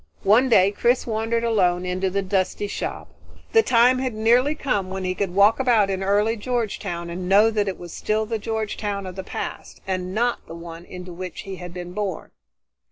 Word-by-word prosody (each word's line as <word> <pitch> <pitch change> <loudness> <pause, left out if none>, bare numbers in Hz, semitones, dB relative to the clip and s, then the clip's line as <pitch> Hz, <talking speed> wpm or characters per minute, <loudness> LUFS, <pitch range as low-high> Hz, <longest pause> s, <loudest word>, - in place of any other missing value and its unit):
One 230 +7 +5
day 195 -4 +5
Chris 240 +4 +1
wandered 225 +1 -1
alone 185 -6 +2
into 185 +1 -1
the 200 +1 -1
dusty 190 +1 0
shop. 205 - -5 0.4
The 450 - +6
time 250 - +4
had 255 -3 -2
nearly 240 +7 +3
come 205 -11 -1
when 190 0 -4
he 185 0 -1
could 185 -1 -3
walk 205 +4 +5
about 230 -6 +3
in 190 0 -2
early 205 +3 +2
Georgetown 205 -7 -3
and 180 +1 -5
know 210 +3 +6
that 210 -2 0
it 190 - -3
would 175 -1 -9
still 215 +1 -1
be 220 - -16
the 225 - 0
Georgetown 210 -2 -3
of 185 -1 -7
the 190 - -5
past, - - -6
and 185 0 -3
not 240 +2 +1
the 165 - -8
one 170 0 -9
into 180 -1 -9
which 180 +1 -6
he 195 -1 -7
had 180 -1 -8
been 175 0 -7
born. 200 -4 -4
200 Hz, 205 wpm, -23 LUFS, 185-225 Hz, 0.4 s, The